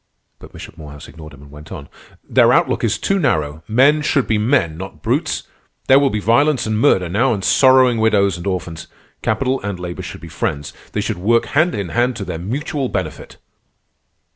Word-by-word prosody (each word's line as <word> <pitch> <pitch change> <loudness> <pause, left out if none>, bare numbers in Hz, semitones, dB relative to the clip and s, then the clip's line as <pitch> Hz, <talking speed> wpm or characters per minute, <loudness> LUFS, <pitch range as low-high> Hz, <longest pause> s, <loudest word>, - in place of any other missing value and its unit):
But - - -14
Bishop - - -12
Morehouse 75 -2 -11
ignored 75 +1 -12
him 70 0 -15
and 70 - -16
went 75 +1 -13
on: 70 -2 -8 0.4
"Their - - +4
outlook - - +1
is - - +1
too 195 0 0
narrow. 80 - -1
Men 140 +7 +3
should 140 -3 +1
be 110 -2 0
men, 110 - +1
not 90 -3 -9
brutes. - - -1 0.4
There 135 +1 +6
will 140 -1 +2
be 105 - -2
violence 130 +5 +2
and 110 -1 -1
murder 95 -9 +3
now, 110 +10 +1
and 95 - -6
sorrowing 130 -2 +4
widows 100 -4 +2
and 85 +2 -7
orphans. 85 -4 -4 0.3
Capital 130 +5 -1
and 100 -3 -5
labor 90 -1 -6
should - - -9
be - - -10
friends. 75 -1 -4 0.2
They 105 - -1
should 105 -3 -3
work 115 +5 +2
hand 160 +2 +1
in 100 -4 -4
hand 120 - 0
and 125 0 -1
to 105 -3 -6
their 80 - -5
mutual 135 - -3
benefit." - - -5
105 Hz, 200 wpm, -18 LUFS, 85-130 Hz, 0.4 s, There